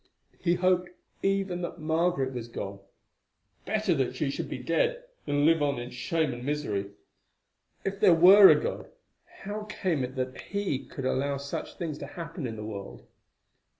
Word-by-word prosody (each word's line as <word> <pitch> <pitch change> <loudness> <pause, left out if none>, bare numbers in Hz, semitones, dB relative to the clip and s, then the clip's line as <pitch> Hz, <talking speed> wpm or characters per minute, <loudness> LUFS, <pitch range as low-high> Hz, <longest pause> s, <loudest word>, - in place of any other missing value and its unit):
He 175 -1 +2
hoped 180 0 +2 0.3
even 195 -2 0
that 175 - -5
Margaret 160 -4 0
was 120 -2 -5
gone; 100 -4 -6 0.9
better 215 -4 +1
that 135 -5 -1
she 145 -3 -1
should - - -4
be - - -4
dead - - 0 0.2
than 145 0 +2
live 165 -1 +4
on 140 -2 +1
in 120 +1 -6
shame 155 +3 -1
and 120 0 -7
misery. 125 -9 -2 1.0
If 195 0 -2
there 180 - +6
were 190 +4 +9
a - - +6
God, 485 - -4 0.5
how 210 +2 -5
came 180 -8 -1
it 130 +2 -5
that 130 0 -3
He 200 -9 -2
could 135 - -6
allow 140 +2 0
such 140 +1 -5
things 155 -4 -4
to 140 - -6
happen 165 -3 -6
in 115 - -5
the 105 -1 -6
world? 100 -2 -8
155 Hz, 170 wpm, -28 LUFS, 130-185 Hz, 1.0 s, were